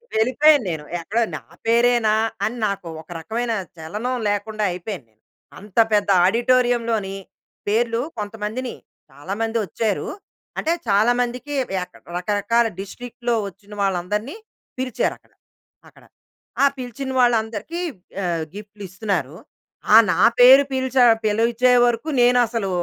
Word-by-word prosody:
వెళ్ళిపోయా 260 +7 +5
నేను. 160 -3 -4 0.2
ఎక్కడో 220 +8 0
నా - - -11 0.2
పేరేనా? 235 -1 +3 0.3
అని 240 +3 -1
నాకు 195 -3 -4
ఒక 160 - -23
రకమైన 230 +7 -2 0.2
చలనం 210 +11 -4
లేకుండా 210 +1 -2
అయిపోయానెను. 170 - -8 0.4
అంత 205 +1 -15 0.2
పెద్ద 205 -1 +2 0.2
ఆడిటోరియంలోని, 235 -2 +1 0.5
పేర్లు 230 +2 +1 0.2
కొంతమందిని 215 +4 -4 0.3
చాలా 145 +8 -7
మందొచ్చారు. 225 -2 -1 0.5
అంటే 330 - +1
చాలా 210 +4 +4
మందికి 250 +4 -4 0.3
యక 180 - -6 0.3
రకరకాల 210 +5 +1
డిస్ట్రిక్ట్‌లో 240 +4 -4
ఒచ్చిన 200 +2 -13
వాళ్ళందరిని 200 - -1 0.4
పిలిచారు 255 -1 -1
అక్కడ, - - -33 0.6
అక్కడ. - - -20 0.6
ఆ - - +7
పిలిచిన 260 +1 -5
వాళ్ళందరికీ 235 - +1 0.4
ఆహ్, 170 -2 -1
గిఫ్ట్‌లిస్తున్నారు. 200 - -4 0.6
ఆ - - +10 0.2
నా 170 - -1 0.2
పేరు 260 +3 +9
పిలిచ 260 0 -2 0.3
పిలిచే 230 +4 +2
వరకు 240 +5 0
నేనసలు 240 -4 +3
225 Hz, 110 wpm, -21 LUFS, 200-245 Hz, 0.6 s, ఆ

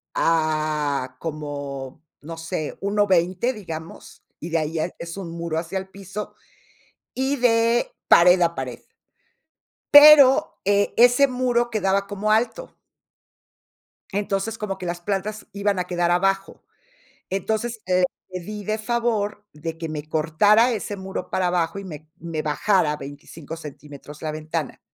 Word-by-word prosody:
a 155 -5 0
como, 145 -2 -6 0.2
no 165 +2 -8
sé, 160 -2 -4
1,20 195 +2 +1
digamos. 165 -7 -9 0.2
Y 170 - -6
de 165 - +1
ahí 155 0 -3
ya 165 +1 -1
es 170 +2 -7
un 190 -4 -6
muro 170 -1 -3
hacia 170 +3 -4
el 190 0 -9
piso, 200 +2 -7 0.8
y 265 +2 0
de 235 - +2 0.2
pared 180 +1 +7
a 170 -1 +2
pared. 125 -3 -5 1.1
Pero, 290 0 +8
eh, 200 +1 +2
ese 245 +3 +6
muro 245 -2 0
quedaba 200 -2 +1
como 205 +1 -2
alto. 245 - -1 1.4
Entonces, 205 +2 -2
como 195 -2 -4
que 185 - -6
las 175 0 -3
plantas 205 +3 -3
iban 200 -1 0
a 180 - 0
quedar 175 -1 0
abajo, 195 +2 0 0.7
entonces, 220 +4 -2
le 185 0 +3 0.3
pedí 200 +3 -6
de 215 +2 -1
favor 215 -2 -1
de 160 +2 -6
que 165 -1 -4
me 155 -1 -6
cortara 205 +10 +3
ese 205 -2 -4
muro 190 -1 -6
para 185 - 0
abajo 175 +1 0
y 200 - -7
me 155 -4 -9
me 165 -2 -4
bajara 155 0 +1
25 145 +3 -9
centímetros 150 -1 -11
la 155 -1 -2
ventana, 155 -1 -4
185 Hz, 140 wpm, -23 LUFS, 160-210 Hz, 1.4 s, Pero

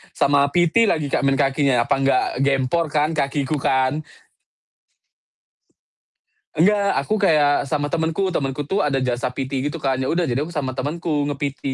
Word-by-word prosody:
Sama 140 0 +3
PT 175 +6 +3
lagi, 155 -7 0
Kak, - - +1
main 135 - +2
kakinya 135 -3 +2
apa - - +2
nggak 135 -1 +2 0.2
gempor 140 +4 +1
kan 150 +1 +1
kakiku 140 +1 -1
kan. 130 +2 +1 2.6
Enggak, 200 +5 +3
aku 175 - -2
kayak 145 -5 +2
sama 145 0 -2
temenku, 165 +4 -1
temenku 140 -4 -2
tuh 190 +8 -2
ada 135 -7 0
jasa 125 -1 -1
PT 130 +1 -3
gitu 150 +2 -5
kan. 135 -1 0
Ya 130 - -2
udah, 170 +6 0
jadi 130 -7 -1
aku 170 - -10
sama 140 -4 -2
temenku, 145 +3 -2
nge-PT. 145 -1 -4
145 Hz, 160 wpm, -21 LUFS, 135-160 Hz, 2.6 s, Sama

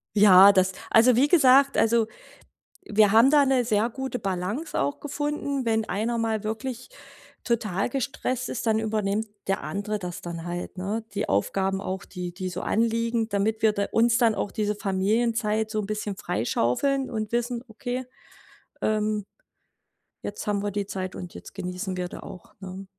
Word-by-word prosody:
Ja, 200 -1 +9
das 190 -1 +3 0.2
also 235 +2 +6
wie 265 +5 +4
gesagt 275 -3 +5
also 225 0 +3 0.8
wir 210 -1 +4
haben 230 +5 +6
da 295 -1 +6
'ne 260 -2 +2
sehr 220 0 +1
gute 265 0 -4
Balance 195 - -3
auch 140 +1 -1
gefunden. 290 -2 -3
Wenn 220 -1 +1
einer 225 +5 -1
mal 220 -2 -1
wirklich 235 +3 -4 0.5
total 215 -5 -1
gestresst 255 -1 -2
ist, 235 - -4
dann 220 -1 +3
übernimmt 215 -1 -1 0.2
der 195 -5 -1
andere 200 +8 -3
das 180 -1 -6
dann 170 -1 -6
halt, 175 +2 -5
ne? 205 +5 -3
Die 200 - -1
Aufgaben 190 - 0
auch, 185 -2 -4
die 180 -1 -6
die 185 +1 -5
so 180 +1 -5
anliegen, 230 0 0
damit 215 +2 -1
wir 220 - +6
da 200 -1 0
uns 230 0 +3
dann 230 -3 +3
auch 205 - -2
diese 210 -2 -1
Familienzeit 215 +2 0
so 215 - -1
'n 205 - -3
bisschen 210 -1 -3
freischaufeln 155 - 0
und 215 -2 -4
wissen: 240 0 -1
„Okay, 245 +3 -4 0.8
ähm, 215 -1 0 1.0
jetzt 205 - -6
haben 205 -1 0
wir 205 - -1
die 200 0 -2
Zeit 185 -2 -5
und 180 -1 -8
jetzt - - -11
genießen 185 0 -4
wir 180 -1 -3
da - - -9
auch.“, 180 - -11
ne? 190 0 -8
215 Hz, 170 wpm, -26 LUFS, 195-235 Hz, 1.0 s, Ja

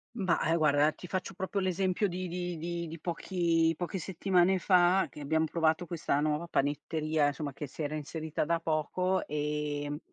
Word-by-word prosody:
Ma, 185 -7 +1
ehm, 165 - +3
guarda 150 -1 +4
ti 180 - -12
faccio 185 +1 -3
proprio 190 +2 -2
l'esempio 185 +1 +1
di 185 0 -4
di 175 0 -3
di 170 +1 -3
di 165 +1 -8
pochi 165 -1 +1
poche 180 +2 -3
settimane 185 +1 +2
fa, 180 0 +4
che - - -12
abbiam 160 +2 +1
provato 160 +1 +1
questa 160 -4 -1
nuova 150 +3 0
panetteria, 155 +1 0
insomma 145 -1 -3
che 145 +2 -6
si 150 - -6
era 150 +1 -2
inserita 155 +1 -3
da 165 +2 +1
poco, 165 +4 0
ehm, 150 0 -2
165 Hz, 170 wpm, -31 LUFS, 150-180 Hz, -, guarda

